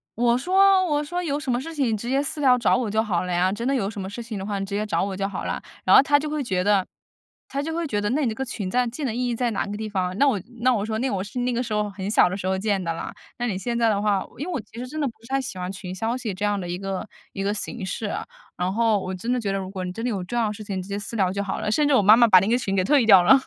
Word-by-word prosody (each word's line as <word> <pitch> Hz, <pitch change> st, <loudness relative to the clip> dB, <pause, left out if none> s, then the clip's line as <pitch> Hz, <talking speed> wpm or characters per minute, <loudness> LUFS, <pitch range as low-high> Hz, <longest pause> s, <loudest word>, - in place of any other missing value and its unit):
我 240 Hz, +1 st, +3 dB
说 380 Hz, +5 st, +4 dB
我 295 Hz, -4 st, +1 dB
说 350 Hz, +4 st, -3 dB
有 290 Hz, -3 st, -1 dB
什 290 Hz, -3 st, -6 dB
么 245 Hz, +1 st, +1 dB
事 330 Hz, +4 st, -7 dB
情 290 Hz, -4 st, 0 dB
你 -, -, +2 dB
直 235 Hz, +4 st, -5 dB
接 270 Hz, +1 st, +2 dB
私 305 Hz, +1 st, -4 dB
聊 255 Hz, -3 st, +5 dB
找 240 Hz, -, +3 dB
我 230 Hz, -5 st, -1 dB
就 220 Hz, +1 st, +2 dB
好 190 Hz, -6 st, -1 dB
了 180 Hz, -, -4 dB
呀， 180 Hz, +2 st, +2 dB
真 235 Hz, +3 st, -4 dB
的 275 Hz, -, +2 dB
有 215 Hz, -7 st, 0 dB
什 210 Hz, -2 st, -6 dB
么 190 Hz, -, -5 dB
事 235 Hz, +4 st, -6 dB
情 225 Hz, -3 st, -6 dB
的 190 Hz, -, -5 dB
话 205 Hz, -1 st, -2 dB
你 195 Hz, -, -2 dB
直 200 Hz, -, -5 dB
接 210 Hz, +1 st, -1 dB
找 210 Hz, -, 0 dB
我 195 Hz, 0 st, -2 dB
就 195 Hz, -, -2 dB
好 -, -, -5 dB
了 -, -, -1 dB
呀。 -, -, -6 dB, 0.2 s
然 -, -, +6 dB
后 270 Hz, -, +9 dB
她 290 Hz, +1 st, +4 dB
就 305 Hz, +1 st, -4 dB
会 300 Hz, -2 st, -2 dB
觉 185 Hz, -6 st, 0 dB
得 195 Hz, -1 st, +3 dB, 0.6 s
她 275 Hz, +1 st, -3 dB
就 320 Hz, +2 st, -3 dB
会 335 Hz, -1 st, -2 dB
觉 205 Hz, -5 st, -1 dB
得 205 Hz, -, 0 dB
那 290 Hz, +5 st, +1 dB
你 -, -, +2 dB
这 220 Hz, -, -2 dB
个 265 Hz, -, -2 dB
群 210 Hz, -6 st, -4 dB
在 250 Hz, +5 st, +2 dB
进 250 Hz, +5 st, -4 dB
的 230 Hz, -3 st, -2 dB
意 250 Hz, 0 st, 0 dB
义 -, -, 0 dB
在 240 Hz, +1 st, 0 dB
哪 205 Hz, -, -1 dB
个 205 Hz, -, -5 dB
地 220 Hz, 0 st, -4 dB
方？ 185 Hz, -2 st, -1 dB
那 285 Hz, -, +5 dB
我 250 Hz, -7 st, +2 dB, 0.2 s
那 255 Hz, +1 st, +4 dB
我 210 Hz, -3 st, -1 dB
说 220 Hz, 0 st, -2 dB
那 260 Hz, +1 st, 0 dB
我 190 Hz, -2 st, -1 dB
是 205 Hz, +5 st, -6 dB
那 250 Hz, +1 st, 0 dB
个 245 Hz, -, 0 dB
时 230 Hz, -3 st, -4 dB
候 210 Hz, 0 st, 0 dB
很 195 Hz, 0 st, -5 dB
小 215 Hz, -, +5 dB
的 185 Hz, -, -3 dB
时 190 Hz, -, -6 dB
候 190 Hz, 0 st, +1 dB
建 200 Hz, -1 st, 0 dB
的 170 Hz, -, -1 dB
啦， -, -, -5 dB, 0.3 s
那 240 Hz, -, 0 dB
你 200 Hz, -5 st, -2 dB
现 235 Hz, +4 st, -2 dB
在 230 Hz, -, +3 dB
的 205 Hz, -2 st, +2 dB
话 205 Hz, -2 st, +1 dB
因 290 Hz, -, -4 dB
为 365 Hz, -, -4 dB
我 325 Hz, -, -1 dB
其 220 Hz, -, -13 dB
实 245 Hz, -, -4 dB
真 305 Hz, +5 st, -6 dB
的 285 Hz, -, +1 dB
不 235 Hz, -, -6 dB
是 230 Hz, -, -14 dB
不 -, -, -5 dB
太 270 Hz, -, +3 dB
喜 265 Hz, -7 st, -5 dB
欢 180 Hz, +1 st, -3 dB
群 185 Hz, -1 st, -7 dB
消 225 Hz, +5 st, -1 dB
息 230 Hz, -5 st, -4 dB
这 195 Hz, +3 st, -6 dB
样 205 Hz, -1 st, +1 dB
的 180 Hz, -, -5 dB
一 175 Hz, +1 st, -3 dB
个 195 Hz, +1 st, -4 dB, 0.2 s
一 195 Hz, -, -5 dB
个 200 Hz, +1 st, 0 dB
形 210 Hz, +2 st, -4 dB
式 210 Hz, +3 st, -3 dB
啊， -, -, -4 dB, 0.3 s
然 180 Hz, +1 st, -1 dB
后 225 Hz, -1 st, +2 dB
我 185 Hz, 0 st, -4 dB
真 230 Hz, +7 st, -3 dB
的 250 Hz, -, +1 dB
觉 200 Hz, -4 st, -2 dB
得 -, -, 0 dB
如 190 Hz, -1 st, -5 dB
果 185 Hz, -2 st, -4 dB
你 180 Hz, -, -4 dB
真 225 Hz, -, -6 dB
的 245 Hz, -, 0 dB
有 200 Hz, -5 st, -2 dB
重 240 Hz, +6 st, -4 dB
要 230 Hz, -, +2 dB
的 210 Hz, -, -2 dB
事 210 Hz, 0 st, -9 dB
情 190 Hz, -2 st, -3 dB
直 185 Hz, -, -11 dB
接 200 Hz, +1 st, -2 dB
私 215 Hz, +3 st, -6 dB
聊 190 Hz, -3 st, +2 dB
就 200 Hz, -, -2 dB
好 200 Hz, -1 st, -3 dB
了。 210 Hz, -, -1 dB
甚 295 Hz, +4 st, +3 dB
至 290 Hz, -, +3 dB
我 255 Hz, -, +5 dB
妈 210 Hz, +3 st, +7 dB
妈 235 Hz, -1 st, +6 dB
把 185 Hz, -4 st, +8 dB
那 195 Hz, -, -1 dB
个 240 Hz, -, +3 dB
群 200 Hz, -6 st, -2 dB
给 185 Hz, -, +2 dB
退 265 Hz, +4 st, +4 dB
掉 195 Hz, -5 st, +8 dB
了。 265 Hz, +10 st, +7 dB
220 Hz, 395 characters per minute, -24 LUFS, 195-250 Hz, 0.6 s, 后